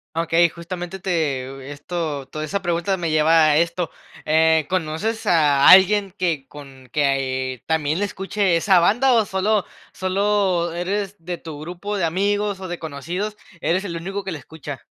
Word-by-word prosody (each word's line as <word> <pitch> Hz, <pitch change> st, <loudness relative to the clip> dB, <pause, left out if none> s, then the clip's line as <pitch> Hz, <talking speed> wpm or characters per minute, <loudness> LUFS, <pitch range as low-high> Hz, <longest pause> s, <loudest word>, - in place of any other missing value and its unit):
Okey, 165 Hz, +1 st, +3 dB
justamente 175 Hz, +2 st, -7 dB
te 135 Hz, -7 st, -2 dB
esto, 145 Hz, -2 st, -4 dB
toda 155 Hz, +2 st, -5 dB
esa 195 Hz, +6 st, -2 dB
pregunta 175 Hz, +2 st, 0 dB
me 170 Hz, -3 st, -2 dB
lleva 155 Hz, +1 st, +4 dB
a 150 Hz, -, +3 dB
esto, 170 Hz, +1 st, 0 dB, 0.3 s
eh, 160 Hz, 0 st, +3 dB
¿conoces 185 Hz, +6 st, -2 dB
a 145 Hz, -6 st, +5 dB
alguien 195 Hz, +1 st, +6 dB
que 165 Hz, -7 st, -1 dB
con 135 Hz, -3 st, -13 dB
que, 145 Hz, +2 st, +1 dB
ah, 135 Hz, 0 st, +2 dB
eh, 130 Hz, -1 st, -3 dB
también 160 Hz, 0 st, 0 dB
la 205 Hz, -, +1 dB
escuche 200 Hz, +1 st, -5 dB
a 195 Hz, -, +4 dB
esa 185 Hz, +2 st, +4 dB
banda, 245 Hz, +9 st, +3 dB
o 225 Hz, -3 st, +3 dB
solo 200 Hz, +2 st, 0 dB, 0.3 s
solo 190 Hz, -3 st, 0 dB
eres, 195 Hz, +3 st, -3 dB
de 175 Hz, +1 st, -4 dB
tu 160 Hz, -3 st, -9 dB
grupo 180 Hz, +6 st, -5 dB
de 180 Hz, -, +1 dB
amigos 200 Hz, +3 st, 0 dB
o 190 Hz, -, -6 dB
de 175 Hz, -1 st, -5 dB
conocidos, 170 Hz, +8 st, -5 dB, 0.2 s
eres 175 Hz, +5 st, 0 dB
el 180 Hz, -4 st, -5 dB
único 195 Hz, +4 st, -4 dB
que 190 Hz, -, -5 dB
le 160 Hz, -, -5 dB
escucha? 145 Hz, -4 st, -9 dB
170 Hz, 175 wpm, -21 LUFS, 155-195 Hz, 0.3 s, alguien